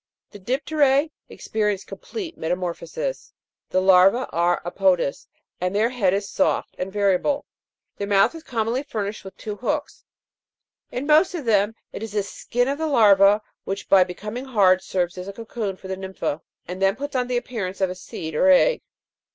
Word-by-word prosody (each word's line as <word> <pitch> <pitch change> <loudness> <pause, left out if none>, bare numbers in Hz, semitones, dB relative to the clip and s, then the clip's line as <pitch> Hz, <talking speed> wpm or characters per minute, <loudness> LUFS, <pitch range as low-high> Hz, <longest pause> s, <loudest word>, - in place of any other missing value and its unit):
15. 205 - -12
The 255 +6 +1
dip'teras 290 -1 +2 0.2
experience 210 -3 -2
complete 430 -9 -7
metamorphosis. 185 - -4 0.4
The 185 - +2
larvae 190 +6 +5
are 170 +1 +2
apodous, 180 -5 +1 0.3
and 180 +2 -1
their 220 +3 +3
head 210 -8 +2
is 200 +1 -1
soft - - 0
and 185 +1 -3
variable; 205 +8 +1 0.5
their 200 - -3
mouth 200 +5 +4
is 325 - -9
commonly 235 -2 -1
furnished 215 -7 -4
with 190 -1 -11
two 210 -1 -6
hooks. 295 +5 -3 0.9
In 255 +3 -3
most 310 +5 +4
of 310 -6 -5
them 210 -1 +2 0.2
it - - -6
is 220 -2 -6
the 205 -1 +1
skin 245 +5 -2
of 280 +2 -2
the 320 - 0
larva, 210 -5 +5 0.2
which, 195 +1 -5
by 190 -2 +7
becoming 210 +8 -6
hard, 195 -7 +4
serves 180 -1 -2
as 180 - -7
a 200 - -6
cocoon 220 -2 -4
for 190 - -11
the 190 - -3
nympha, 190 -5 -4 0.3
and 180 +2 -6
then 195 +1 +3
puts 285 +2 -6
on 250 -1 +1
the 250 -1 0
appearance 210 -6 -4
of 190 -2 +1
a - - -3
seed 165 -3 -7
or 275 - +3
egg. 380 - +5
205 Hz, 180 wpm, -23 LUFS, 190-255 Hz, 0.9 s, by